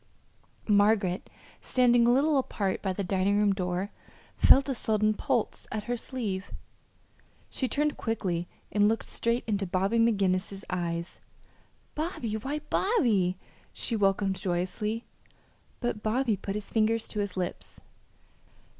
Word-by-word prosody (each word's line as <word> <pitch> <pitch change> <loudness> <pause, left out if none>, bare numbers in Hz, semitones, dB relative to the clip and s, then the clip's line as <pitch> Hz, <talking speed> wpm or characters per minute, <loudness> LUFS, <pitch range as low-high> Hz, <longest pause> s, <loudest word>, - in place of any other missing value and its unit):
Margaret, 205 -3 +3 0.3
standing 245 -2 +4
a - - +6
little 280 +3 +3
apart 200 -7 -2
by 190 - -1
the 195 +2 -3
dining 195 +2 +1
room 205 -1 +3
door, 185 +1 -2 0.4
felt 275 +1 +6
a 275 - 0
sudden 215 -2 +1
pull 215 +1 0 0.2
at 215 -1 -3
her 245 +2 -2
sleeve. 220 -6 -4 1.0
She 260 - -1
turned 295 +3 0
quickly 180 -6 -2 0.2
and 205 0 +4
looked 225 - -1
straight 235 +1 -1
into 205 -3 -1
Bobby 195 +6 +1
McGinnis's 195 -3 +1
eyes. 170 -1 -3 0.7
"Bobby, 300 - -3
why, 270 +8 -3
Bobby!" 220 - +2 0.4
she 230 - -2
welcomed 195 -2 +1
joyously; 195 +5 -2 0.8
but 240 -4 -2
Bobby 230 +1 +1
put 195 +1 -5
his 210 -1 -6
finger 225 0 +3
to 220 -1 -5
his 200 -2 -3
lips. 180 -1 -4
210 Hz, 130 wpm, -28 LUFS, 190-235 Hz, 1.0 s, a